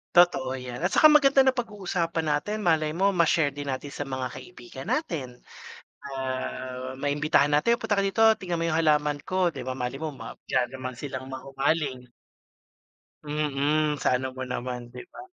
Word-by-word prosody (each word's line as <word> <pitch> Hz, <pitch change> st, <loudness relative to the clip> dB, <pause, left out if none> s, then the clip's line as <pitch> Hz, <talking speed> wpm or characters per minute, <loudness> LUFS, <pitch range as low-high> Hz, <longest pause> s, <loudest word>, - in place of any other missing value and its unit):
Totoo 175 Hz, -7 st, +5 dB
‘yan, 125 Hz, +4 st, -7 dB
at 180 Hz, -, +1 dB
saka 310 Hz, -, +7 dB
maganda 285 Hz, -2 st, +5 dB
napag-uusapan 205 Hz, -11 st, 0 dB
natin. 150 Hz, +9 st, 0 dB
Malay 160 Hz, -5 st, +2 dB
mo 195 Hz, +4 st, +1 dB
ma-share 165 Hz, -3 st, +3 dB
din 145 Hz, -1 st, -4 dB
natin 130 Hz, +2 st, -4 dB
sa -, -, -3 dB
mga 130 Hz, -2 st, -3 dB
kaibigan 130 Hz, -5 st, -10 dB
natin. 155 Hz, -, -2 dB, 0.7 s
Ah, 130 Hz, -1 st, -4 dB
maimbitahan 145 Hz, +1 st, +2 dB
natin, 150 Hz, +11 st, +3 dB
"Punta 215 Hz, -3 st, 0 dB
ka 200 Hz, -, +2 dB
dito 195 Hz, +3 st, 0 dB, 0.2 s
tignan 175 Hz, -3 st, -3 dB
mo 165 Hz, -, +1 dB
yung 160 Hz, -, +1 dB
halaman 150 Hz, -2 st, +2 dB
ko," 185 Hz, -1 st, +1 dB
‘di 135 Hz, -6 st, -7 dB
ba? 130 Hz, -, -2 dB
Malay 125 Hz, +1 st, -4 dB
mo 155 Hz, -1 st, -4 dB
ma -, -, -9 dB
diyan 125 Hz, -, +1 dB
naman 130 Hz, -1 st, -6 dB
silang 130 Hz, 0 st, -6 dB
mahumaling. 135 Hz, 0 st, -2 dB, 1.2 s
Mm, 150 Hz, 0 st, 0 dB
sa 125 Hz, -, +3 dB
ano 130 Hz, 0 st, -5 dB
mo 130 Hz, -, -8 dB
naman, 125 Hz, -1 st, -4 dB
‘di 125 Hz, 0 st, -10 dB
ba? 360 Hz, -, -9 dB
150 Hz, 170 wpm, -26 LUFS, 130-175 Hz, 1.2 s, saka